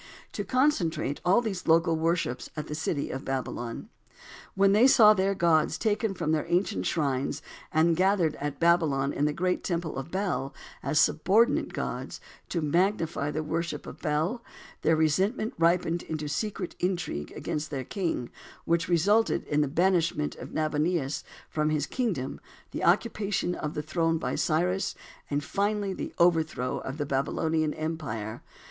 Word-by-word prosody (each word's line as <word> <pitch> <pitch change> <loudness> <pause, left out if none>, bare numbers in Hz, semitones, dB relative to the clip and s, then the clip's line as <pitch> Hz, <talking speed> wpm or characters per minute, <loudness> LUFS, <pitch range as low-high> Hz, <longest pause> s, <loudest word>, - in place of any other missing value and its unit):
to - - -3
concentrate 175 - +1
all 190 +7 +4
these 200 -6 -4
local 165 0 +4
worships 160 -6 -1
at 150 - -3
the - - -6
city 150 -1 -2
of 135 - -5
Babylon. 125 -3 -4 0.7
When 195 0 +4
they 215 +6 +6
saw 215 -5 +8
their 195 0 +1
gods 160 -2 +2
taken 215 -2 0
from 155 - -1
their 160 0 0
ancient 170 - 0
shrines 140 -4 -1 0.3
and 165 +1 +3
gathered 185 -3 +2
at 145 0 -4
Babylon 160 -5 +3
in 145 - 0
the 150 - +2
great 180 +4 -1
temple 170 -5 -2
of 135 +4 -5
Bel, 180 -7 -2 0.3
as 150 - +1
subordinate 190 +10 +3
gods - - -4 0.3
to 170 - -1
magnify 170 -2 +1
the 155 +1 -2
worship 165 +2 -3
of - - -10
Bel, 165 +10 -1 0.4
their 160 +1 +3
resentment 190 - +1
ripened 170 0 +2
into 155 -1 -4
secret 190 +4 -3
intrigue 175 - -2
against 150 +1 -3
their 135 -3 -3
king, 165 - -2 0.3
which 170 +1 +1
resulted 205 +7 +3
in 150 0 +1
the 145 - +2
banishment 170 -1 +1
of - - -9
Nabonidus 155 -1 0 0.2
from 155 0 0
his 150 -2 0
kingdom, 180 - -2 0.3
the - - -4
occupation 205 -5 +1
of 150 -3 -4
the 150 - -2
throne 165 +1 +1
by - - -3
Cyrus, 180 +5 0 0.3
and 145 0 -1
finally 200 +2 -1
the - - -5
overthrow 160 -7 +2
of 135 +2 -6
the 145 - -2
Babylonian 155 +3 0
empire. 130 -9 -4
165 Hz, 155 wpm, -28 LUFS, 150-185 Hz, 0.7 s, saw